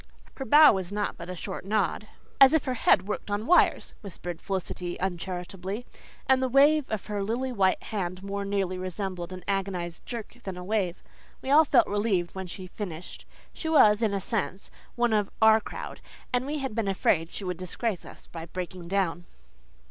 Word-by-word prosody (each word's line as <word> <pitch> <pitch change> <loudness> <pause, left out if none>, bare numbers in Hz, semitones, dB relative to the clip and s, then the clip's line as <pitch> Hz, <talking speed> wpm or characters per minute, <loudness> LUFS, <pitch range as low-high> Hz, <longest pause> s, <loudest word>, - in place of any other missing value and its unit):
Her 270 - -4
bow 295 +3 +8
was 190 -2 -3
naught 205 0 -2
but 170 0 -9
a 185 - -4
short 190 +2 -6
nod 210 0 0 0.3
"as 270 +1 +8
if 320 - +2
her 255 - 0
head 200 -5 +3
worked 210 - -4
on 205 +2 -1
wires," 355 - +3
whispered 175 -4 -7
Felicity 180 -2 -4
uncharitably 185 +3 -4 0.4
and 265 0 +4
the 260 - +1
wave 285 +2 +4
of 215 -3 -3
her 205 -1 -3
lily 245 +5 -2
white 195 -5 +2
hand 185 -3 -4
more 200 0 -3
nearly 195 -2 -1
resembled 185 -1 -4
an 185 -1 -8
agonized 190 -4 -2
jerk 235 0 -6
than 190 -2 -5
a 180 - -6
wave. 190 -3 -1 0.4
We 265 - -2
all 310 +2 +7
felt 270 -3 +5
relieved 200 -4 0
when 190 -1 -5
she 185 +1 -8
finished. 180 -3 -8 0.3
She 320 - -4
was, 215 -9 +6
in 220 -3 +2
a - - 0
sense, 195 -2 -3 0.2
one 240 -2 +2
of 210 -2 +1
"our 220 0 +6
crowd," - - -7 0.3
and 250 +2 +1
we 300 +1 -2
had 265 -5 -3
been 225 -2 -1
afraid 170 -4 +1
she 200 - -7
would 180 -2 -3
disgrace 185 +3 -3
us - - -13
by 165 -1 -8
breaking 180 0 -6
down. 175 -2 -1
195 Hz, 190 wpm, -27 LUFS, 180-225 Hz, 0.4 s, bow